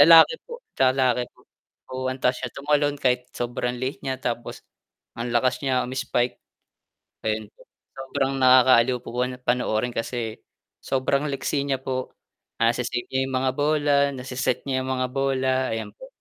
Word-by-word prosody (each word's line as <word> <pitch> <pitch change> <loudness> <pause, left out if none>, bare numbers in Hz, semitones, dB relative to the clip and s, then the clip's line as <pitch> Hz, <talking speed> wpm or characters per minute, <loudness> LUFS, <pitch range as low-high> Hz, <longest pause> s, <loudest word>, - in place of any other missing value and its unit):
Lalaki 165 - +9
po, 475 +1 -8 0.2
lalaki 130 -2 +3
po. - - -22 0.5
Oo, 130 0 -2
antaas 130 -1 0
niya 125 - -3
tumalon 145 0 +1
kahit 125 -2 0
sobrang 120 0 -2
liit 130 +3 -4
niya 130 -1 -3
tapos 120 -2 -4 0.5
ang 120 +1 -3
lakas 125 +2 +2
niya 130 -3 +1
umi-spike, 125 -1 -1 0.9
ayun 110 0 -1
po. - - -27 0.4
Sobrang 135 0 -1
nakakaaliw 130 -1 +6
po - - -11
po 125 - -1 0.3
panoorin 120 -1 +1
kasi 115 -1 -3 0.4
sobrang 140 +2 0
liksi 140 0 -1
niya 135 -2 0
po, 130 -1 -3 0.5
nase-save 120 +1 +1
niya 130 0 0
'yung 130 - -5
mga 130 0 +1
bola, 150 0 +2 0.2
nase-set 130 0 -1
niya 130 -1 0
'yung 130 - -4
mga 130 0 0
bola, 130 -1 +1
ayan 110 - -4
po. - - -12
130 Hz, 150 wpm, -24 LUFS, 125-135 Hz, 0.9 s, Lalaki